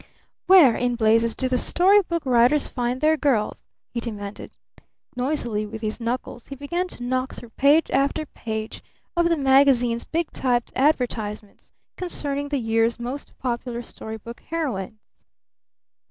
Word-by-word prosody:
"Where 345 Hz, -11 st, +7 dB
in 245 Hz, 0 st, 0 dB
blazes 230 Hz, 0 st, +3 dB
do 260 Hz, -, -1 dB
the 255 Hz, -1 st, +1 dB
story 390 Hz, +4 st, +4 dB
book 340 Hz, -4 st, -3 dB
writers 250 Hz, +3 st, +4 dB
find 245 Hz, 0 st, -2 dB
their 310 Hz, +1 st, +4 dB
girls?" 250 Hz, -8 st, 0 dB, 0.2 s
he 240 Hz, -, -3 dB
demanded. 210 Hz, -4 st, -6 dB, 0.7 s
Noisily 245 Hz, -5 st, -1 dB
with 220 Hz, +1 st, -8 dB
his 215 Hz, +2 st, -3 dB
knuckles 240 Hz, 0 st, -4 dB
he 275 Hz, -, -7 dB
began 345 Hz, +7 st, -2 dB
to 245 Hz, -, -9 dB
knock 255 Hz, +1 st, -2 dB
through 235 Hz, -, -11 dB
page 285 Hz, +6 st, +3 dB
after 280 Hz, +3 st, +1 dB
page 220 Hz, -5 st, -6 dB, 0.3 s
of 340 Hz, 0 st, +3 dB
the 335 Hz, -, +2 dB
magazine's 265 Hz, -4 st, +4 dB
big 330 Hz, 0 st, -2 dB
typed 245 Hz, -2 st, 0 dB
advertisements 230 Hz, -7 st, -1 dB, 0.3 s
concerning 285 Hz, -5 st, -3 dB
the 285 Hz, -, 0 dB
year's 225 Hz, -1 st, +1 dB
most 250 Hz, +4 st, -6 dB
popular 240 Hz, -1 st, -3 dB
story 220 Hz, -1 st, -7 dB
book 235 Hz, +2 st, -10 dB
heroines. 220 Hz, -, -5 dB
250 Hz, 145 wpm, -23 LUFS, 230-285 Hz, 0.7 s, Where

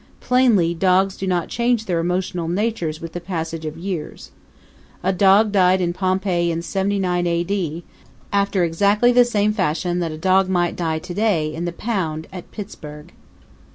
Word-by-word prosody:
Plainly 235 Hz, -10 st, +3 dB
dogs 190 Hz, +2 st, +2 dB
do 190 Hz, -, -5 dB
not 180 Hz, -2 st, 0 dB
change 235 Hz, -1 st, 0 dB
their 175 Hz, -4 st, 0 dB
emotional 180 Hz, 0 st, -2 dB
natures 175 Hz, -4 st, -2 dB
with 165 Hz, 0 st, -8 dB
the 175 Hz, -, -5 dB
passage 165 Hz, -2 st, -4 dB
of 155 Hz, -, -6 dB
years. 175 Hz, -2 st, -6 dB, 0.7 s
A 190 Hz, -, +1 dB
dog 200 Hz, +3 st, +4 dB
died 185 Hz, -2 st, +4 dB
in 175 Hz, -1 st, 0 dB
Pompeii 185 Hz, -2 st, 0 dB
in 165 Hz, 0 st, -2 dB
79 190 Hz, -2 st, 0 dB
A. 170 Hz, 0 st, +1 dB
D. 175 Hz, -3 st, -3 dB, 0.5 s
after 200 Hz, -2 st, +2 dB
exactly 200 Hz, +8 st, +3 dB
the 245 Hz, 0 st, +6 dB
same 210 Hz, -3 st, +1 dB
fashion 180 Hz, -2 st, -1 dB
that 170 Hz, -2 st, -2 dB
a 155 Hz, -, -6 dB
dog 190 Hz, +3 st, +2 dB
might 175 Hz, -2 st, +1 dB
die 160 Hz, -2 st, -1 dB
to 175 Hz, +3 st, -7 dB
day 175 Hz, -7 st, 0 dB
in 165 Hz, +2 st, -4 dB
the 175 Hz, -, -2 dB
pound 170 Hz, -6 st, -3 dB
at 180 Hz, -2 st, -9 dB
Pittsburgh. 150 Hz, -8 st, -9 dB
180 Hz, 170 wpm, -21 LUFS, 170-200 Hz, 0.7 s, the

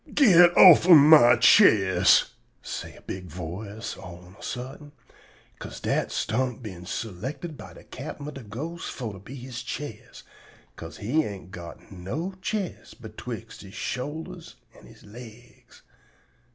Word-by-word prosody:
"Git 175 Hz, -, +6 dB
offen 175 Hz, -1 st, +9 dB
my 145 Hz, -5 st, +7 dB
chest!" 95 Hz, -, +5 dB, 0.3 s
say -, -, -7 dB
a -, -, -18 dB
big 95 Hz, -1 st, -7 dB
voice 95 Hz, +7 st, -7 dB
all 85 Hz, -1 st, -11 dB
on 90 Hz, +1 st, -17 dB
a -, -, -16 dB
suddent, 135 Hz, +4 st, -8 dB, 0.7 s
'ca'se -, -, -9 dB
dat -, -, -2 dB
stump 125 Hz, +2 st, -1 dB
am -, -, -16 dB
been 90 Hz, -5 st, -9 dB
selected 125 Hz, -, -6 dB
by -, -, -12 dB
de -, -, -14 dB
captain 145 Hz, +1 st, -9 dB
ob 150 Hz, -, -7 dB
de 135 Hz, -, -9 dB
ghostes 145 Hz, +11 st, -7 dB
for 115 Hz, -5 st, -6 dB
to 95 Hz, -, -11 dB
be 120 Hz, +8 st, -11 dB
he 130 Hz, 0 st, -10 dB
chest, 120 Hz, -1 st, -8 dB, 0.5 s
'ca'se 80 Hz, 0 st, -10 dB
he 140 Hz, +10 st, 0 dB
ain't 95 Hz, -, -8 dB
got 85 Hz, 0 st, -11 dB
no 120 Hz, -, -5 dB
chest 195 Hz, -8 st, -5 dB
betwixt 115 Hz, 0 st, -9 dB
he 100 Hz, -, -12 dB
shoulders 145 Hz, +10 st, -6 dB, 0.2 s
an' -, -, -17 dB
he -, -, -16 dB
legs. 120 Hz, +2 st, -15 dB
120 Hz, 150 wpm, -25 LUFS, 100-150 Hz, 0.7 s, offen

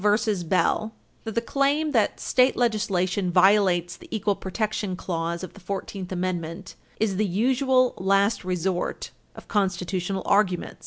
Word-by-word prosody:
Bell, 210 Hz, 0 st, +4 dB
supra, 210 Hz, 0 st, 0 dB, 0.3 s
that 225 Hz, -, -5 dB
the 230 Hz, -, +2 dB
claim 285 Hz, +5 st, +1 dB
that 225 Hz, -6 st, +1 dB
state 255 Hz, +1 st, +3 dB
legislation 200 Hz, -5 st, 0 dB
violates 180 Hz, -1 st, +3 dB
the -, -, -15 dB
equal 210 Hz, -2 st, 0 dB
protection 205 Hz, 0 st, -3 dB
clause 170 Hz, -1 st, -3 dB
of 185 Hz, -, -7 dB
the -, -, -14 dB
Fourteenth 195 Hz, 0 st, -5 dB
Amendment 180 Hz, 0 st, -3 dB, 0.3 s
is 205 Hz, -4 st, 0 dB
"the 215 Hz, -, +2 dB
usual 255 Hz, +6 st, +2 dB
last 195 Hz, +3 st, +2 dB
resort 180 Hz, 0 st, -2 dB, 0.2 s
of -, -, -12 dB
constitutional 190 Hz, -1 st, -1 dB
arguments." 195 Hz, -3 st, +1 dB
195 Hz, 140 wpm, -25 LUFS, 180-220 Hz, 0.3 s, Bell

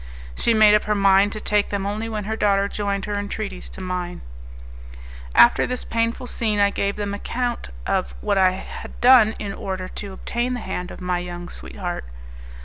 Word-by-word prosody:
She 230 Hz, -, +2 dB
made 215 Hz, -1 st, +7 dB
up 210 Hz, -, +3 dB
her 210 Hz, -, +1 dB
mind 195 Hz, 0 st, +4 dB
to 215 Hz, -, -5 dB
take 210 Hz, -1 st, +1 dB
them 200 Hz, -1 st, -2 dB
only 215 Hz, +3 st, -3 dB
when 215 Hz, -2 st, -3 dB
her 220 Hz, +2 st, -2 dB
daughter 200 Hz, -2 st, +2 dB
joined 200 Hz, -1 st, -2 dB
her 205 Hz, -1 st, -2 dB
entreaties 60 Hz, -, -5 dB
to -, -, -9 dB
mine. 180 Hz, -1 st, -4 dB, 1.1 s
After 120 Hz, -, +6 dB
this 250 Hz, 0 st, -3 dB
painful 230 Hz, +2 st, -1 dB
scene 220 Hz, -4 st, -1 dB
I 200 Hz, 0 st, +4 dB
gave 200 Hz, 0 st, -1 dB
them 205 Hz, -1 st, -3 dB
an 205 Hz, -, -4 dB
account 245 Hz, +1 st, -3 dB, 0.2 s
of -, -, -1 dB
what 195 Hz, -, +1 dB
I 185 Hz, -1 st, +6 dB
had 190 Hz, -, -8 dB
done 240 Hz, -3 st, +6 dB
in 200 Hz, -1 st, -4 dB
order 185 Hz, -2 st, -4 dB
to 200 Hz, +1 st, -7 dB
obtain 240 Hz, +5 st, -2 dB
the -, -, -4 dB
hand 180 Hz, -3 st, -4 dB
of -, -, -10 dB
my 180 Hz, -1 st, 0 dB
young 175 Hz, 0 st, -6 dB
sweetheart. 175 Hz, -, -6 dB
200 Hz, 195 wpm, -23 LUFS, 185-215 Hz, 1.1 s, made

